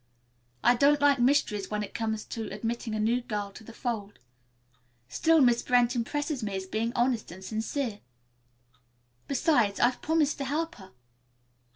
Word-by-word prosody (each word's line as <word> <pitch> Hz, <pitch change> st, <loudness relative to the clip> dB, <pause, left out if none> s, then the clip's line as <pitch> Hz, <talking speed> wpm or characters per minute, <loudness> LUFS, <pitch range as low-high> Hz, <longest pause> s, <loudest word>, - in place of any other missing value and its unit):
I 240 Hz, -, +6 dB
don't 285 Hz, +3 st, +4 dB
like 285 Hz, -2 st, +4 dB
mysteries 240 Hz, -6 st, +2 dB
when 210 Hz, 0 st, -2 dB
it -, -, -8 dB
comes 220 Hz, -1 st, -2 dB
to 225 Hz, -4 st, -5 dB
admitting 225 Hz, +2 st, -3 dB
a -, -, -2 dB
new 230 Hz, +3 st, +1 dB
girl 210 Hz, -4 st, -4 dB
to 210 Hz, -, -12 dB
the 230 Hz, -, -11 dB
fold. 225 Hz, -4 st, -4 dB, 0.9 s
Still, 320 Hz, -, +3 dB
Miss 240 Hz, -2 st, +4 dB
Brent 245 Hz, 0 st, +2 dB
impresses 290 Hz, +4 st, -2 dB
me 205 Hz, -3 st, -3 dB
as 190 Hz, 0 st, -3 dB
being 220 Hz, +4 st, -2 dB
honest 240 Hz, -5 st, 0 dB
and 190 Hz, +2 st, -10 dB
sincere. 220 Hz, +2 st, -3 dB, 1.3 s
Besides, 245 Hz, -7 st, +2 dB
I've 245 Hz, +1 st, +2 dB
promised 315 Hz, -2 st, +1 dB
to 275 Hz, -, -2 dB
help 320 Hz, +5 st, -2 dB
her." 190 Hz, -2 st, -13 dB
235 Hz, 160 wpm, -28 LUFS, 215-275 Hz, 1.3 s, I